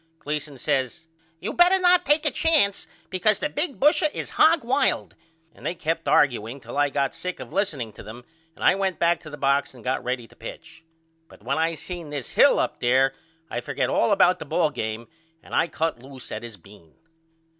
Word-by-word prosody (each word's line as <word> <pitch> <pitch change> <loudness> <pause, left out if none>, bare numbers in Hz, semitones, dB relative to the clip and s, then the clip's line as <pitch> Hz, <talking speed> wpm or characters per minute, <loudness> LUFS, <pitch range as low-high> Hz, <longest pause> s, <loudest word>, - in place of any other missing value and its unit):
Gleason 150 -2 -5
says 135 +6 -2 0.3
You 210 +6 -4
better 355 +2 +5
not 360 -1 +4
take 300 +2 +3
a 300 - +3
chance 300 - +2 0.2
because 200 +3 +2
the 300 - -2
big 295 0 -3
busher 300 +2 +4
is - - -5
hogwild, 285 -4 +2 0.4
and - - -18
they 175 - -2
kept 165 0 -2
argueing 120 -2 +2
till - - -10
I 145 0 +2
got 140 -1 -1
sick 180 0 -6
of - - -9
listening 140 - -2
to - - -12
them 120 +3 -11 0.3
and - - -9
I - - +7
went 190 -1 -1
back 170 0 +2
to 155 - -11
the 145 - -9
box 140 -1 +1
and 120 - -14
got 130 0 -1
ready 125 -1 -3
to - - -21
pitch. - - -11 0.4
But - - -18
when 140 +6 -1
I 165 +1 +1
seen 170 0 -7
this 145 -4 -5
Hill - - +5
up - - -1
there 130 +2 +3 0.3
I 120 - -4
forgot - - -2
all - - +2
about 190 -2 +4
the 160 - -7
ball 155 +1 +1
game 110 -3 -4 0.4
and - - -14
I 165 - +2
cut 160 -7 -2
loose 130 -1 -11
at 110 - -4
his 115 -3 -10
bean. 100 -3 -19
155 Hz, 205 wpm, -24 LUFS, 130-195 Hz, 0.4 s, I